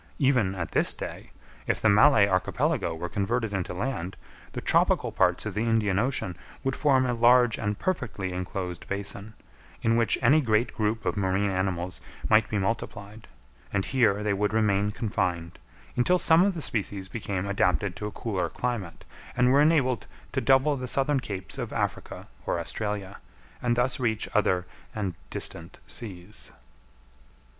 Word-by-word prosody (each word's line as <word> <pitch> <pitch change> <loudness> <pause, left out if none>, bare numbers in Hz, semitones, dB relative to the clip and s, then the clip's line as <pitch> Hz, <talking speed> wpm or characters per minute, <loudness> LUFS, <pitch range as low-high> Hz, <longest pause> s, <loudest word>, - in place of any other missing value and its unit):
Even 125 -9 +2
at 85 -3 -4
this - - +2
day, - - -7 0.4
if - - +1
the - - +2
Malay 105 0 +6
Archipelago 100 - 0
were 85 +2 -4
converted 110 +3 -1
into 95 -2 -2
land, 95 -2 -3 0.4
the - - -3
tropical - - +2
parts - - +2
of 110 - -3
the 105 - -1
Indian 110 -4 +2
Ocean 120 -7 -1 0.3
would 135 -1 0
form 135 -3 +3
a 125 - 0
large 120 0 +4
and 105 -1 -1
perfectly 115 - -2
enclosed 90 -1 -5
basin, 100 +2 -4 0.5
in 115 0 +3
which 115 -1 +2
any 145 +6 +6
great 115 -2 +1
group 110 0 -1
of - - 0
marine 100 0 +1
animals 95 -1 -2 0.3
might 110 0 +5
be 105 - -1
multiplied; 105 +1 -4 0.4
and 95 -1 0
here 110 -6 +2
they 105 -1 +1
would 105 +2 0
remain 105 -2 +2
confined, 90 -7 -2 0.4
until 180 +9 +3
some 165 -1 +5
of 195 0 +2
the 165 - -4
species 100 -5 -3
became 100 -2 -3
adapted 90 -2 +1
to 105 - -4
a - - -6
cooler 95 -8 -2
climate, 115 -7 -4 0.3
and 125 0 +4
were 140 +2 +5
enabled 140 -7 +2 0.2
to - - -1
double 135 +2 +4
the 130 -1 -5
southern 135 +2 +2
capes 100 -7 -6
of - - -4
Africa - - -3 0.2
or - - 0
Australia, 100 +2 -4 0.4
and 120 -1 +1
thus 125 +2 +1
reach 110 -3 0
other 95 -4 +2 0.3
and 100 -4 -2 0.2
distant 85 +2 -5
seas. 100 -3 -7
105 Hz, 160 wpm, -27 LUFS, 95-125 Hz, 0.5 s, Malay